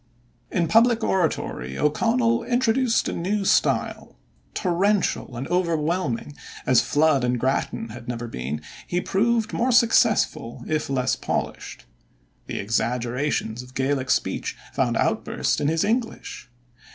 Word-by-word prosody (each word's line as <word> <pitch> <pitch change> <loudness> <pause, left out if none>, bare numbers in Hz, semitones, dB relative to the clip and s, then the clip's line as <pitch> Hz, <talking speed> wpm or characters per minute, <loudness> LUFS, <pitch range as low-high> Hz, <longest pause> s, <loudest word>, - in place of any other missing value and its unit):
In 170 -2 0
public 230 +4 +4
oratory 150 - -1
O'Connell 230 +9 +2
introduced 245 -1 +1
a - - -2
new 195 +4 -1
style. - - +1 0.4
Torrential 185 - 0
and 130 - -4
overwhelming 170 -6 -1 0.3
as 130 -2 +5
Flood 145 -3 +2
and 125 0 0
Grattan 130 -2 -1
had 120 +2 -10
never 120 -1 -4
been, 70 - -5 0.2
he 175 - 0
proved 225 +4 0
more 250 +2 +1
successful 225 - +3
if 155 -2 -2
less 130 -1 +1
polished. - - -4 0.6
The - - -4
exaggerations 120 +2 -1
of 125 +1 -14
Gaelic 135 -1 0
speech - - -1 0.2
found - - +1
outburst - - 0
in 145 - +1
his 160 +1 +1
English. 225 - -3
155 Hz, 125 wpm, -24 LUFS, -, 0.6 s, as